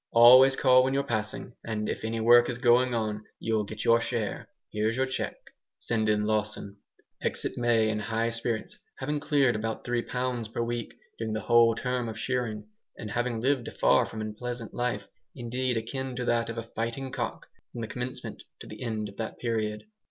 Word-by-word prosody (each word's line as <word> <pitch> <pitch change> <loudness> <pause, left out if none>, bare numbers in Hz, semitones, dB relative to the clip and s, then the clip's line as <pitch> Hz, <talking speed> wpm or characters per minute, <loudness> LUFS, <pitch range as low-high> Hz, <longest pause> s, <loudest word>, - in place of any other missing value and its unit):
Always 130 +3 +9
call 130 -1 +5
when 135 +1 0
you're 140 - +2
passing, 115 -1 -3
and 110 -2 -3
if - - -3
any 115 +1 -2
work 120 +2 +6
is 120 - -3
going 120 0 +4
on 110 -2 -2
you'll 110 -2 0
get - - -6
your 115 0 +5
share. 115 -3 -3 0.2
Here's 110 +3 0
your 130 - +2
cheque. 130 0 -5 0.3
Send 110 -2 0
in 105 0 +2
Lawson!" 105 -2 -2 0.4
Exit - - -2
May, 120 -2 +3
in 110 0 0
high 115 +2 -1
spirits, 115 -1 -3 0.2
having 150 +3 -2
cleared 145 -5 +2
about 110 +1 -3
three 120 -1 0
pounds 125 -2 -2
per 115 +1 -2
week, 120 -1 -4 0.2
during 110 -1 -2
the 110 - -2
whole 115 -1 +5
term 125 -1 -2
of 110 - -6
shearing, 115 -3 -2 0.3
and 105 -2 -6
having 120 0 -1
lived 130 -1 +1
a - - -5
far - - +3
from 110 - -6
unpleasant 115 +2 -5
life, 120 -5 -2 0.3
indeed 125 0 -1
akin 130 +3 -4
to 125 0 -3
that 115 -1 +1
of 115 - -5
a 115 - -3
fighting 115 +4 -4
cock, 120 -3 -4 0.3
from 120 - -6
the 115 - -3
commencement 125 +3 -5 0.2
to - - -8
the - - -10
end 110 -3 -2
of 100 - -13
that 110 - -4
period. 110 -3 -2
115 Hz, 195 wpm, -28 LUFS, 110-125 Hz, 0.4 s, Always